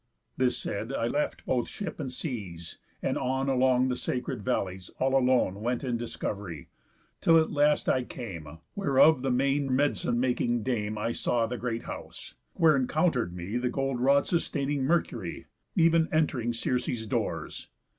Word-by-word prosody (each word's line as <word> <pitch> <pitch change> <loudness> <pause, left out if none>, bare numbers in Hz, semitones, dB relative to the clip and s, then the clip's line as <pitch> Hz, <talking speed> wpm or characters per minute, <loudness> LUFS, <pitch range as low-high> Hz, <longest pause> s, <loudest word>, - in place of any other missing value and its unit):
This 125 -1 +1
said, 110 +5 -4
I 115 - -1
left 145 +5 -1
both 125 -2 0
ship 200 -7 -6
and 135 -4 -3
seas, 100 - -6 0.2
and - - 0
on 130 +1 -1
Along 130 -1 +3
the 125 - 0
sacred 125 -2 -3
valleys 95 -2 -2
all 135 +1 +1
alone 125 -7 +2
Went 120 +3 -1
in 125 -3 -1
discov'ry, 100 -7 -5 0.5
till 165 -1 +6
at 160 -1 +2
last 150 0 +3
I 130 - +2
came 95 - -7 0.3
Where 140 -9 0
of 155 -2 +7
the 135 - 0
main 135 +2 +1
med'cine 130 -2 +1
making 120 -2 +1
Dame 110 -4 -1
I 110 +2 -1
saw 120 0 +1
the 120 +2 -4
great 115 -2 -3
house; - - -8 0.2
where 160 -4 +5
encounter'd 130 - +1
me 90 +6 -3
The 125 0 0
golden 135 -2 -1
rod 140 +2 +4
sustaining 145 -5 0
Mercury, 125 - -1 0.3
Ev'n 165 0 +4
ent'ring 140 -7 +1
Circe's 120 -1 -1
doors. 105 - -3
125 Hz, 160 wpm, -28 LUFS, 115-140 Hz, 0.5 s, of